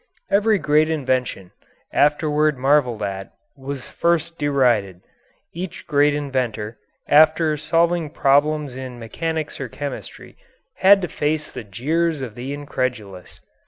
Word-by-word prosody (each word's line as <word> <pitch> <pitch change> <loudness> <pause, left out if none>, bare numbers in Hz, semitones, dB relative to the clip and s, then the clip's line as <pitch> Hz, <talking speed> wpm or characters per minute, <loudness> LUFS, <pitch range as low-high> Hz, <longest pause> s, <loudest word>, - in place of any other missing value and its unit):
Every 210 +2 +3
great 155 -2 +2
invention, 130 - -1 0.4
afterward 150 0 +2
marvelled 130 -5 +2
at, 95 -1 -5 0.2
was 135 -1 -6
first 170 -1 0
derided. 120 -11 +1 0.5
Each 175 +1 -7
great 145 -1 +3
inventor, 125 -6 -3 0.3
after 155 +1 +5
solving 165 +2 +1
problems 145 0 +2
in 130 -2 -7
mechanics 155 +7 -4
or 135 - -3
chemistry, 145 +3 -8 0.4
had 195 0 +6
to - - 0
face 155 0 -2
the - - -7
jeers 150 - -1
of 125 -5 -5
the 125 +4 -6
incredulous. 125 -9 -5
145 Hz, 120 wpm, -21 LUFS, 125-155 Hz, 0.5 s, had